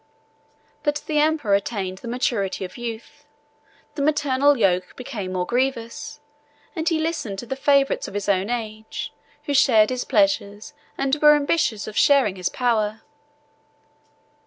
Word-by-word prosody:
But 295 -1 -1
the 300 -1 0
emperor 300 -8 +2
attained 195 -2 -1
the - - -9
maturity 230 -6 -1
of 180 - -11
youth; 235 -2 -7 0.7
the 285 - -4
maternal 285 -1 +2
yoke 185 -4 +1
became 235 -8 -6
more 180 -1 -1
grievous; 255 +4 -2 0.6
and 320 +1 0
he 330 - +1
listened 315 -11 -3
to 215 - -6
the 265 - -4
favorites 275 0 +2
of - - -9
his 205 0 -3
own 195 +1 +1
age, 220 -2 -5 0.3
who 285 - -2
shared 245 -6 +5
his 255 -1 -2
pleasures, 205 -2 0 0.2
and 270 0 -1
were 300 0 +8
ambitious 285 -7 0
of 215 - -8
sharing 270 -9 +4
his 180 -2 -2
power. 220 -3 0
240 Hz, 145 wpm, -23 LUFS, 205-285 Hz, 0.7 s, were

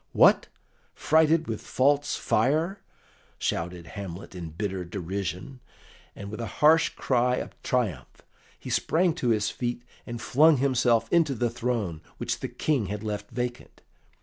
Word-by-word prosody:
"What! - - +5 0.5
Frighted 160 +1 +3
with 110 -2 -3
false 145 +2 +1
fire!" 160 - +1 0.6
shouted 85 0 -3
Hamlet 95 0 -8
in 85 -3 -6
bitter 95 +2 -3
derision, 95 +6 -5 0.6
and 100 0 -8
with 110 - -5
a 115 - -3 0.2
harsh 160 +2 +6
cry 125 -1 +1
of - - -5
triumph 125 -7 -2 0.4
he - - -7
sprang 170 +1 +2
to 130 -7 -1
his 105 -2 +1
feet, 120 -1 -3 0.2
and 120 -1 -5
flung 150 +5 +4
himself 120 -4 +2
into 160 -5 +3
the 120 0 0
throne 115 -9 -2 0.2
which - - -2
the - - -3
King 135 -10 0
had 105 +2 -5
left 105 -1 -4
vacant. 125 +1 -5
120 Hz, 145 wpm, -27 LUFS, 100-140 Hz, 0.6 s, harsh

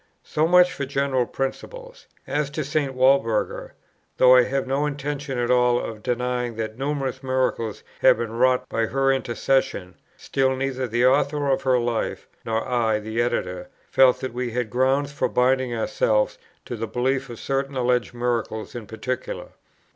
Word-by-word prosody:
So 155 +1 0
much 180 +1 +5
for 145 - -4
general 135 -2 0
principles; - - -6 0.2
as 145 +1 -1
to 155 - 0
St. 140 -1 -1
Walburga, 130 -4 +1 0.4
though 130 0 +7
I 125 -1 +6
have 135 +1 -1
no 140 +3 0
intention 145 -1 -4
at 120 0 0
all 125 -1 +4
of 110 -2 -6
denying 125 0 -2
that 110 -1 -4
numerous 135 -1 -3
miracles 130 -5 -1 0.2
have - - +5
been 115 -1 -3
wrought 125 +2 +2
by 115 -1 -1
her 135 +2 +2
intercession, 130 -6 -1 0.2
still, 130 -1 0
neither 130 -1 -2
the 120 +2 +1
Author 140 +2 +2
of 135 0 +1
her 130 -2 +3
Life, 120 -2 -2 0.2
nor 115 0 -2
I, 115 -3 +1
the 110 +2 -2
Editor, 90 -6 -2 0.2
felt 130 -2 +5
that 130 -2 -4
we 125 0 -2
had 120 -2 -3
grounds 135 +3 +1
for 145 - -1
binding 130 -1 +1
ourselves 110 -1 0 0.3
to 120 - -5
the 115 0 -4
belief 130 +2 -1
of 120 - -8
certain 135 0 -2
alleged 125 -1 0
miracles 120 -2 -2
in 115 -4 -7
particular. 125 +4 -5
130 Hz, 165 wpm, -23 LUFS, 120-135 Hz, 0.4 s, though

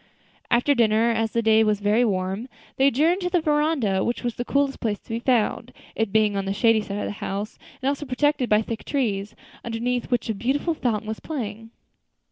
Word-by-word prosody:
After 245 +4 +3
dinner, 230 -1 +3
as 225 -1 0
the 230 - +1
day 220 0 +5
was 210 -2 +1
very 210 +4 +3
warm, 195 +2 -1 0.3
they 270 - +4
adjourned 320 +8 +2
to 360 - -1
the 355 0 +2
veranda, 295 - +1
which 240 - -2
was 240 -1 -1
the 245 - -4
coolest 280 +2 0
place 210 -3 -1
to - - -29
be 225 0 -2
found; 240 -3 0 0.2
it 225 -3 -1
being 215 -1 +3
on 195 0 -1
the 195 - -1
shady 225 0 +4
side 205 -1 -5
of - - -2
the - - -3
house, 200 +2 -4 0.2
and - - 0
also 285 +1 -1
protected 265 0 +1
by 210 +1 +4
thick 225 0 -5
trees, 210 -7 -2 0.3
underneath 235 +1 -2
which 245 -3 0
a 220 - 0
beautiful 270 - 0
fountain 225 -8 -2
was 220 0 -4
playing. 225 -7 -5
230 Hz, 210 wpm, -24 LUFS, 215-270 Hz, 0.3 s, day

